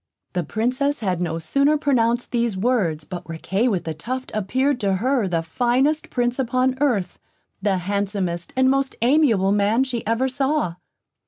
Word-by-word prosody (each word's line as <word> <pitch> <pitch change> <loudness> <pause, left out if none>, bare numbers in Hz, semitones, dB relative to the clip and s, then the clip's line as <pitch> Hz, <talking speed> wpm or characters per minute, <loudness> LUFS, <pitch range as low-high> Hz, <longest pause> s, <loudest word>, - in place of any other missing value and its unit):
The 180 - 0
Princess 255 - -1
had 185 -4 -1
no 165 -2 -1
sooner 280 - +2
pronounced 245 -5 +1
these 235 -4 0
words, 190 -9 0
but 180 +2 -7
Riquet 190 +8 -1
with 185 -6 -1
the 160 - -3
Tuft 255 +12 -5
appeared 255 +7 0
to 200 -4 +1
her 245 +1 +1
the 165 -2 -1
finest 255 - +1
Prince 245 +1 -1
upon 255 +1 +1
earth; 210 -11 0 0.4
the 200 -2 +1
handsomest 190 -2 -2
and 260 0 +3
most 270 0 +1
amiable 235 -8 +3
man 205 +5 +3
she 250 -3 -3
ever 230 +4 +1
saw. 270 - 0
230 Hz, 160 wpm, -22 LUFS, 190-260 Hz, 0.4 s, and